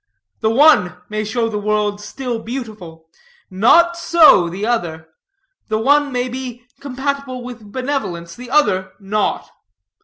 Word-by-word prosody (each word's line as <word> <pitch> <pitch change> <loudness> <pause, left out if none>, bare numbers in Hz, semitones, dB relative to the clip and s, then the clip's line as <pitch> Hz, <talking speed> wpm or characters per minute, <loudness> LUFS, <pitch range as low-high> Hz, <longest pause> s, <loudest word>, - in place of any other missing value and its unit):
The 220 - +1
one 230 - +4
may 215 0 -2
show 225 +2 -1
the 210 -2 -3
world 210 0 -1
still 240 +2 -5
beautiful, 215 -10 -8 0.4
not 335 - +4
so 320 - +5
the 190 +5 -4
other. 165 -9 -2 0.6
The 215 - -1
one 285 +5 +2
may 250 0 -1
be 250 -1 -7 0.2
compatible 275 -1 -4
with 235 -4 -10
benevolence, 255 -11 -4
the 245 0 -10
other 190 -10 +1
not. 205 +1 -2
230 Hz, 130 wpm, -18 LUFS, 205-265 Hz, 0.6 s, so